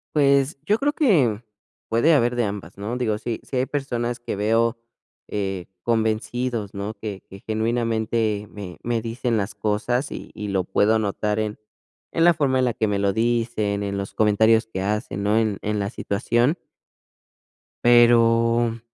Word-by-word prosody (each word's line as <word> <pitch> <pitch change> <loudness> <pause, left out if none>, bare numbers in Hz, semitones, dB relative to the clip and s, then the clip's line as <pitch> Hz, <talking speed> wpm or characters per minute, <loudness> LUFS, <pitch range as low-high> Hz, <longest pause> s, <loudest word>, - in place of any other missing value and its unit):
Pues, 140 0 +3
yo 210 +5 +3
creo 290 +1 +1
que, 140 - +2 0.5
puede 120 +9 +4
haber 120 -4 +2
de 120 - +2
ambas, 100 -3 -6
¿no? 105 +4 -4
Digo, 110 -4 0
si 115 +1 -4
si 130 - -4
hay 125 - +2
personas 120 -4 -2
que 110 - -4
veo, 115 +3 +2 0.5
eh, 95 -3 -3 0.2
convencidos, 115 0 -1
¿no? 100 +2 -4
Que 105 -4 -7
que 95 0 -11
genuinamente 110 -1 -1
me 95 -5 -9
me 120 -1 -1
dicen 115 +1 -2
las 100 0 -2
cosas 115 +6 -1
y - - -8
y 105 - -6
lo 95 -2 0
puedo 105 +4 +2
notar 105 +1 -1
en, 105 -1 -3 0.5
en 165 - +2
la 175 - +7
forma 135 -4 +1
en - - +2
la 120 - 0
que 110 -4 0
me 100 - 0
lo 100 0 +1
dicen, 115 -2 0
en 100 0 -3
los 100 0 -5
comentarios 110 +2 +3
que 95 -4 -5
hacen, 105 0 -2
¿no? 105 +2 +2
En 110 -3 +1
en 105 0 -1
la 100 - -1
situación 120 - 0 1.3
pero, 115 -1 +4
115 Hz, 170 wpm, -23 LUFS, 105-120 Hz, 1.3 s, la